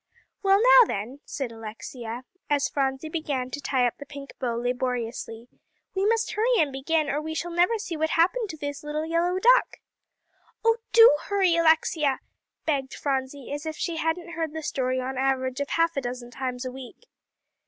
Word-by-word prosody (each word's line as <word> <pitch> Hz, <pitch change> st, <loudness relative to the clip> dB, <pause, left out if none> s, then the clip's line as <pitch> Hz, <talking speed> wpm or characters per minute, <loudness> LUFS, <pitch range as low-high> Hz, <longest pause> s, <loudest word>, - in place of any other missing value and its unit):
"Well, 390 Hz, -1 st, +4 dB
now -, -, +8 dB
then," 230 Hz, +8 st, -4 dB
said 265 Hz, -4 st, -4 dB
Alexia, 225 Hz, +2 st, -7 dB, 0.3 s
as 285 Hz, -1 st, +2 dB
Phronsie 270 Hz, +1 st, -1 dB
began 285 Hz, -6 st, -3 dB
to 290 Hz, -, -5 dB
tie 260 Hz, -3 st, +1 dB
up 240 Hz, -, -2 dB
the 285 Hz, -, -8 dB
pink 280 Hz, -1 st, -9 dB
bow 240 Hz, -3 st, -1 dB
laboriously, 240 Hz, -1 st, -3 dB, 0.5 s
"we 390 Hz, +1 st, +1 dB
must 455 Hz, +1 st, +1 dB
hurry 470 Hz, +3 st, +2 dB
and 295 Hz, -3 st, +2 dB
begin, 305 Hz, +3 st, 0 dB
or 285 Hz, +2 st, -1 dB
we 315 Hz, +1 st, -5 dB
never 345 Hz, +5 st, +2 dB
shall -, -, 0 dB
see 395 Hz, -6 st, -4 dB
what 315 Hz, +1 st, 0 dB
happened 385 Hz, +8 st, +2 dB
to 315 Hz, -, -6 dB
this 285 Hz, -1 st, -5 dB
'Little 300 Hz, +1 st, -3 dB
Yellow 340 Hz, +3 st, +1 dB
Duck.'" -, -, +4 dB, 0.9 s
"Oh, 455 Hz, 0 st, +4 dB
do 455 Hz, -10 st, +8 dB
hurry, 385 Hz, -4 st, +2 dB
Alexia," 320 Hz, -4 st, +3 dB, 0.5 s
begged 275 Hz, -4 st, -1 dB
Phronsie, 270 Hz, -1 st, -3 dB
as 295 Hz, +2 st, -5 dB
if 315 Hz, -, -3 dB
she 340 Hz, -2 st, -2 dB
hadn't 330 Hz, +2 st, -2 dB
heard 325 Hz, -2 st, -3 dB
the 320 Hz, 0 st, -5 dB
story 255 Hz, -3 st, -1 dB
on 255 Hz, 0 st, -3 dB
an 265 Hz, -, -5 dB
average 260 Hz, -1 st, 0 dB
of 285 Hz, -, -2 dB
half 330 Hz, 0 st, +1 dB
a 275 Hz, -, 0 dB
dozen 245 Hz, -1 st, -6 dB
times 255 Hz, -1 st, -4 dB
a 255 Hz, -, -3 dB
week. 260 Hz, -, -11 dB
290 Hz, 185 wpm, -26 LUFS, 260-335 Hz, 0.9 s, now